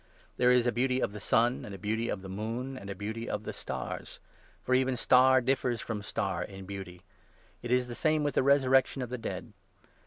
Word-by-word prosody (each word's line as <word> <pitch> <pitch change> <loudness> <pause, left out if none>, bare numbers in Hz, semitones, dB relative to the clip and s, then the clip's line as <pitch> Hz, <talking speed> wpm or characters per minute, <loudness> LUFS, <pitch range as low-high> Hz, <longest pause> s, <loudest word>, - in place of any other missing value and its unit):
There 125 - +4
is 125 -1 +5
a 120 - +3
beauty 125 +2 +1
of - - 0
the 105 - -7
sun, 120 +4 +2
and 100 - -7
a - - -8
beauty 110 +4 -2
of 95 - -3
the - - -7
moon, 115 +7 -4
and 100 -6 -8
a 100 - -4
beauty 110 +4 -5
of 105 - -3
the - - -5
stars; 65 -2 -6 0.4
for 130 - 0
even 130 0 +2
star 130 +2 +5
differs 125 -2 0
from 110 -2 -4
star 100 - -2
in 95 -1 -9
beauty. 95 -2 -8 0.6
It 120 - -6
is 125 0 +2
the 120 - -6
same 155 +4 +1
with 145 -2 0
the - - +3
resurrection 135 -1 +3
of 125 - -6
the 125 0 -4
dead. - - -6
120 Hz, 220 wpm, -30 LUFS, 105-130 Hz, 0.6 s, is